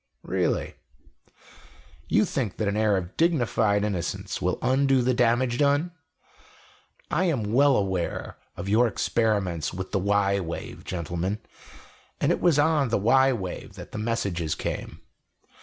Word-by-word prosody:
"Really? - - -1 1.3
You - - +3
think 125 - -3
that 105 - -1
an 100 - 0
air 105 -2 +2
of 90 -1 -5
dignified 120 -10 +2
innocence 95 -6 -3
will - - 0
undo 135 -1 +3
the 130 +1 +2
damage 120 0 +2
done? 145 +4 +2 1.2
I 175 +5 +2
am 115 - -1
well 140 +1 +5
aware 95 -4 -2 0.2
of 85 - -5
your 115 +5 +4
experiments 100 -8 0
with 95 0 -5
the - - +1
y 100 0 +2
wave, 85 -3 -6
gentlemen 90 +3 -3 0.8
and - - +2
it - - 0
was 170 -5 +4
on 145 -3 +3
the 115 - +2
y 130 +6 +4
wave 95 -8 -5
that - - -10
the - - -5
messages 100 -8 -1
came. - - -5
110 Hz, 140 wpm, -26 LUFS, 95-135 Hz, 1.3 s, well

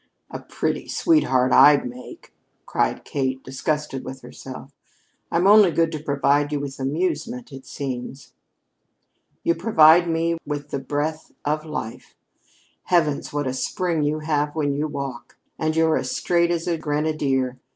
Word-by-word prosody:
"A - - -5
pretty - - -3
sweetheart 130 - +2
I'd 145 -3 +6
make," 125 +1 -11 0.3
cried - - -1
Kate, 130 -2 -2
disgusted 150 +1 -3
with 130 0 -8
herself. 135 +1 -10 0.6
"I'm 170 +2 +2
only 205 -1 +7
good 165 0 +1
to 155 - -4
provide 145 0 +1
you 145 - -1
with 140 -1 -6
amusement, 165 - -2
it 135 -1 -11
seems." 135 -1 -6 1.1
"You 170 - +3
provide 170 -2 +5
me 165 0 0
with 145 0 -5
the 140 - -2
breath 150 +4 -3
of 155 +2 -1
life! 135 -7 -6 0.7
Heavens, 155 -5 +1
what 145 -1 -2
a 130 - -2
spring 170 +4 -1
you 150 +1 0
have 150 -1 -1
when 145 -3 0
you 150 +2 -1
walk! 140 -4 -7 0.2
And 155 0 0
you 165 0 +4
're 160 - +2
as 130 - -3
straight 170 +5 +1
as 170 -1 -1
a 170 -2 0
grenadier. 145 -4 -1
150 Hz, 150 wpm, -23 LUFS, 135-165 Hz, 1.1 s, only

